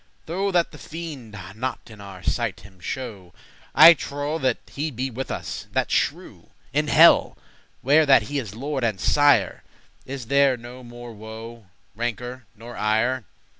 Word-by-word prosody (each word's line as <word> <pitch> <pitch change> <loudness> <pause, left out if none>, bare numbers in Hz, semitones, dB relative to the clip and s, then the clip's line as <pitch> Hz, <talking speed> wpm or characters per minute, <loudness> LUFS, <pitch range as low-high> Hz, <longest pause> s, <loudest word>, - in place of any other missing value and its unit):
Though 190 +5 -1
that 175 -3 +1
the - - -13
fiend 150 -10 -8 0.2
not 130 +4 -3
in 105 -2 -12
our 95 -2 -11
sight 110 -7 -2
him 95 -2 -17
show, 100 -4 -7 0.4
I 170 - +10
trowe 145 +1 -4
that 130 -4 +1
he 150 +3 -3
be 130 0 -4
with 130 +3 -5
us, - - -5
that - - 0
shrew;* - - -1
*impious - - -25
wretch - - -34 0.2
In - - +1
helle, - - +6 0.5
where 150 +4 +4
that 135 -5 +6
he 140 +7 -3
is 110 -6 -7
lord 135 +2 -3
and 110 -5 0
sire, 145 - +3 0.5
Is 135 -2 -6
there 140 +1 +3
no 120 +2 -11
more 120 0 -10
woe, 110 0 -10 0.3
rancour, 120 +1 -4
nor 115 +2 -11
ire. 110 +3 0
120 Hz, 170 wpm, -23 LUFS, 110-140 Hz, 0.5 s, I